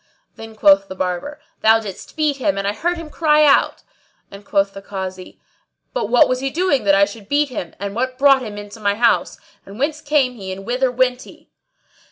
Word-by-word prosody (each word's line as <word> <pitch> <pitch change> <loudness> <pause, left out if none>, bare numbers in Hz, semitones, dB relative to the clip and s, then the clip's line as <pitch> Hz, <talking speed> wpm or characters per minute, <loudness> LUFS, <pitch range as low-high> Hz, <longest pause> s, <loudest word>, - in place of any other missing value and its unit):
Then 225 0 -11
quoth 195 -2 +4
the 190 - -8
Barber, 185 - -4 0.2
"Thou 220 +1 +5
didst 200 -3 -9
beat 300 -3 +1
him 290 -1 -1
and 195 0 -2
I 200 - 0
heard 345 +10 -2
him 325 -2 -9
cry 305 -2 +3
out;" 280 - +3 0.5
and 200 +1 -11
quoth 195 0 0
the 195 - -9
Kazi, 190 -2 -7 0.5
"But - - -2
what 245 0 +5
was 255 0 -1
he 270 +1 -2
doing 295 - 0
that 195 -1 +5
I 200 0 +5
should 205 0 -12
beat 290 0 +2
him, 200 -9 -6
and 200 0 -4
what 255 +3 -2
brought 275 -1 +5
him 215 -4 -7
in 205 0 -8
to 205 - -12
my 205 -1 0
house; 235 +1 +1 0.3
and 200 +1 -12
whence 300 +4 -2
came 285 -4 +1
he 195 -5 -8
and 195 +1 -8
whither 250 +2 0
went 250 0 +1
he?" - - -16
230 Hz, 220 wpm, -19 LUFS, 200-280 Hz, 0.5 s, Thou